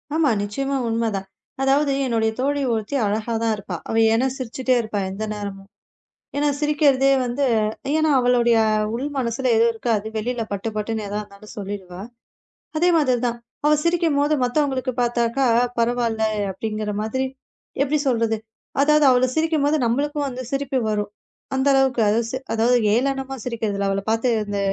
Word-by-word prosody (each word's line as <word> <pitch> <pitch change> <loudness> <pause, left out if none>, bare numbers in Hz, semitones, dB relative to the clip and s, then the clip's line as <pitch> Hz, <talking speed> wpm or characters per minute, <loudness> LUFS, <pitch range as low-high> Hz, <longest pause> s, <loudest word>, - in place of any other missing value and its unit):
ஆமா. 315 -3 +3
நிச்சயமா 275 +7 -2
உண்மை 230 0 0
தான். 195 0 -4 0.3
அதாவது 275 +1 +3
என்னுடைய 225 -2 +1
தோழி 285 +2 0
ஒருத்தி 220 +4 -3
அழகா 215 +3 -1
தான் 225 - +2
இருப்பா. 195 -3 -6
அவ - - -1 0.2
ஏன்னா 245 +4 +2
சிரிச்சுட்டே 255 +1 -1
இருப்பா 215 -2 -3
எந்த 195 +3 -5
நேரமும். 200 -2 -7 0.7
ஏன்னா 295 +1 +2
சிரிக்கிறதே 285 -3 +3
வந்து 245 +4 -1 0.5
ஏன்னா 315 -1 +2
அவளுடைய 240 -2 +3 0.4
உள் 250 +4 -3
மனசுல 245 +1 -1
எது 230 +1 +5
இருக்கோ 230 +1 -3
அதை 215 - -7
வெளில 235 +2 -2
பட்டுப் 210 +2 -4
பட்டுன்னு 215 0 -2
எதா 205 +1 -3
இருந்தாலும் 205 +1 -14
சொல்லிடுவா. 190 -3 -6 0.8
அதே 350 +3 +3
மாதிரி 255 -5 +2
தான் 235 0 -3 0.3
அவ 300 - +5
சிரிக்கும்போது, 320 -4 +2
மத்தவங்களுக்கு 260 0 0
பார்த்தாக்கா 240 +2 +1 0.3
பரவால்ல 230 -1 0 0.3
அப்படிங்கிற 215 +2 -3
மாதிரி. 260 +5 -1 0.6
எப்படி 290 +2 +2
சொல்றது. 230 -3 +1 0.4
அதாவது 300 0 +4
அவள 255 0 +4
சிரிக்கும்போது 310 -2 +2
நம்மளுக்கும் 290 +5 0
அந்தச் 255 -1 -7
சிரிப்பு 275 -1 -1
வரும். 210 -1 -2 0.4
அந்த 265 +1 +1
அளவுக்கு 265 -3 +3
அது 220 +2 +2
ஸ் - - -8 0.2
அதாவது 235 +2 +3 0.2
ஏளனமா 270 +2 0
சிரிக்கிறதில 210 -4 -2
அவள 195 0 0
பாத்து 225 +3 +1
அந்த 205 -1 -3
240 Hz, 150 wpm, -22 LUFS, 220-275 Hz, 0.8 s, எது